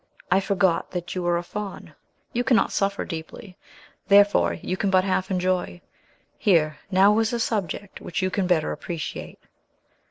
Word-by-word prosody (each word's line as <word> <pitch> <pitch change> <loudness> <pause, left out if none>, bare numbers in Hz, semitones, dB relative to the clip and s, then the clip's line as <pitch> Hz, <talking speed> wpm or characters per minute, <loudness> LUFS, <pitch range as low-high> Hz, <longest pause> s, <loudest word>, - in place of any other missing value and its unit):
I 190 - +5
forgot 190 -3 +1
that 180 0 -4
you 185 - -3
were 175 0 +1
a 170 - -3
Faun. 205 +2 -7 0.4
You 245 - 0
cannot 245 -2 +3
suffer 200 0 -1
deeply; 170 +3 -8 0.5
therefore 205 0 +5
you 185 - -4
can 195 - -1
but 185 -1 +4
half 190 -1 -1
enjoy. 185 -1 -1 0.6
Here, 155 -7 +2
now, 200 +3 +5
is 225 +1 0
a 235 - -1
subject 205 -3 -3
which 180 - -4
you 185 -1 0
can 190 -1 0
better 170 -4 +1
appreciate." 170 -4 -6
185 Hz, 160 wpm, -24 LUFS, 175-200 Hz, 0.6 s, I